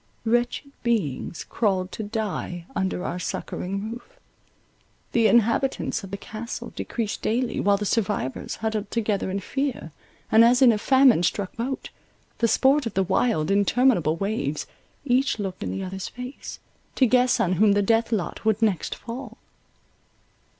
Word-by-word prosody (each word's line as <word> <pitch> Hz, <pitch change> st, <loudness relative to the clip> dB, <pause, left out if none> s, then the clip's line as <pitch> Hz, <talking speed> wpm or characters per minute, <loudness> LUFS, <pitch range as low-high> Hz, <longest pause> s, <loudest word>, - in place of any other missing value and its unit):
Wretched 240 Hz, +4 st, 0 dB
beings 180 Hz, -, -1 dB
crawled 190 Hz, -4 st, -1 dB
to -, -, -5 dB
die 205 Hz, -5 st, -4 dB
under 190 Hz, -1 st, -1 dB
our 180 Hz, -, -3 dB
succouring 195 Hz, +4 st, -4 dB
roof; 245 Hz, -, -11 dB, 0.9 s
the 230 Hz, -2 st, +4 dB
inhabitants 235 Hz, +2 st, +2 dB
of 195 Hz, -, -8 dB
the 200 Hz, -, -4 dB
Castle 220 Hz, +3 st, -7 dB
decreased 225 Hz, -3 st, -3 dB
daily, 235 Hz, +2 st, 0 dB
while 200 Hz, 0 st, +3 dB
the 205 Hz, -, -3 dB
survivors 200 Hz, -, -1 dB
huddled 220 Hz, -1 st, -3 dB
together 210 Hz, -4 st, -1 dB
in 195 Hz, +1 st, -2 dB
fear, 265 Hz, -, -3 dB, 0.4 s
and, 220 Hz, +1 st, +7 dB
as 245 Hz, +2 st, +5 dB
in 260 Hz, -3 st, +7 dB
a 215 Hz, -, 0 dB
famine 260 Hz, -4 st, +5 dB
struck 185 Hz, +2 st, -1 dB
boat, 260 Hz, +4 st, -4 dB, 0.5 s
the 230 Hz, -, +3 dB
sport 270 Hz, +3 st, +3 dB
of 215 Hz, -, -7 dB
the 195 Hz, -, +3 dB
wild, 190 Hz, -3 st, +1 dB
interminable 200 Hz, -, +3 dB
waves, 165 Hz, -7 st, -2 dB, 0.4 s
each 260 Hz, 0 st, +2 dB
looked 195 Hz, -3 st, -5 dB
in -, -, -3 dB
the 195 Hz, -, -3 dB
other's 190 Hz, 0 st, -5 dB
face, 250 Hz, +2 st, -8 dB, 0.4 s
to 265 Hz, -, +4 dB
guess 250 Hz, +1 st, +3 dB
on 185 Hz, -, +2 dB
whom 210 Hz, -2 st, +6 dB
the 205 Hz, 0 st, +2 dB
death 225 Hz, +3 st, +2 dB
lot 205 Hz, -6 st, -2 dB
would 220 Hz, -1 st, +2 dB
next 205 Hz, -6 st, 0 dB
fall. 235 Hz, -1 st, -8 dB
220 Hz, 155 wpm, -25 LUFS, 195-240 Hz, 0.9 s, and